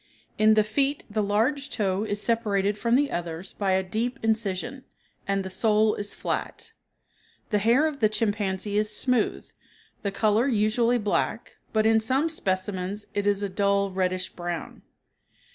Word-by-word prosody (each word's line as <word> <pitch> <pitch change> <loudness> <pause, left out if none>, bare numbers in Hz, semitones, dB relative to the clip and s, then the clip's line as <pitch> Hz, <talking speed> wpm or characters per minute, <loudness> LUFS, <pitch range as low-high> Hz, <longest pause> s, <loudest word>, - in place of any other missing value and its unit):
In 215 0 +6
the 215 - +5
feet 275 +7 0
the 215 +1 0
large 240 +8 0
toe 200 -5 0
is 205 -1 -2
separated 210 -3 +1
from 235 +3 +1
the 285 +2 +2
others 170 +1 -5
by 195 -2 0
a 190 0 +2
deep 230 +7 -2
incision; 225 +3 -1 0.4
and 195 -1 0
the - - -4
sole 215 +2 +3
is 205 0 -4
flat. - - -4 0.8
The 210 - +3
hair 235 +8 +4
of 305 -3 -2
the 215 - +4
chimpanzee 205 -2 -1
is 210 0 0
smooth, 250 -4 0 0.5
the 200 - -1
color 215 +4 +2
usually 230 +1 +2
black, 210 -3 -2
but 215 -1 +2
in 220 0 +5
some 265 +8 +1
specimens 190 - -2
it 205 0 -1
is 205 0 +2
a - - 0
dull, 200 0 +1
reddish 185 0 -1
brown. 175 -1 -6
210 Hz, 160 wpm, -26 LUFS, 195-230 Hz, 0.8 s, In